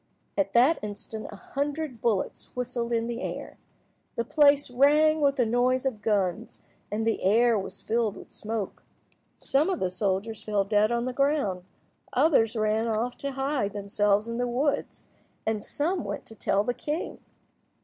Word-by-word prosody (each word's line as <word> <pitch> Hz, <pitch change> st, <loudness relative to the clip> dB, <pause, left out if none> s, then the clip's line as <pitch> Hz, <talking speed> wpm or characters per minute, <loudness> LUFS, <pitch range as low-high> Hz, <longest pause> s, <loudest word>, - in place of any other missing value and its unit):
At 195 Hz, -1 st, 0 dB
that 260 Hz, +8 st, +5 dB
instant 210 Hz, +1 st, -6 dB
a -, -, -8 dB
hundred 285 Hz, +1 st, -4 dB
bullets 215 Hz, -5 st, -1 dB
whistled 245 Hz, -1 st, -2 dB
in 230 Hz, -1 st, +1 dB
the 235 Hz, +1 st, -4 dB
air. -, -, -6 dB, 0.6 s
The 235 Hz, -, -1 dB
place 285 Hz, 0 st, +4 dB
rang 300 Hz, +4 st, +4 dB
with 280 Hz, -1 st, +3 dB
the 250 Hz, -4 st, +2 dB
noise 250 Hz, +3 st, +2 dB
of 240 Hz, -6 st, -2 dB
guns, 195 Hz, -5 st, 0 dB, 0.3 s
and 220 Hz, +2 st, -1 dB
the 225 Hz, -, 0 dB
air 230 Hz, +5 st, +4 dB
was 195 Hz, -, -6 dB
filled 225 Hz, -2 st, 0 dB
with -, -, -12 dB
smoke. 215 Hz, -2 st, -4 dB, 0.6 s
Some 295 Hz, +6 st, +1 dB
of 370 Hz, -, -1 dB
the 185 Hz, -, -1 dB
soldiers 195 Hz, +3 st, -1 dB
fell 210 Hz, -1 st, 0 dB
dead 210 Hz, +2 st, +2 dB
on 235 Hz, 0 st, 0 dB
the 255 Hz, -, -2 dB
ground, 275 Hz, -10 st, 0 dB, 0.5 s
others 235 Hz, -8 st, +3 dB
ran 215 Hz, +1 st, +1 dB
off 230 Hz, +3 st, -1 dB
to 280 Hz, -1 st, -3 dB
hide 270 Hz, -6 st, -1 dB
themselves 205 Hz, +1 st, +1 dB
in 230 Hz, +1 st, -3 dB
the 245 Hz, -, +1 dB
woods, 275 Hz, +4 st, -1 dB, 0.4 s
and 220 Hz, -1 st, -1 dB
some 335 Hz, +3 st, -1 dB
went -, -, -5 dB
to 225 Hz, -, -11 dB
tell 200 Hz, -1 st, +1 dB
the 245 Hz, -, -1 dB
king. 295 Hz, +7 st, -4 dB
235 Hz, 170 wpm, -27 LUFS, 210-275 Hz, 0.6 s, that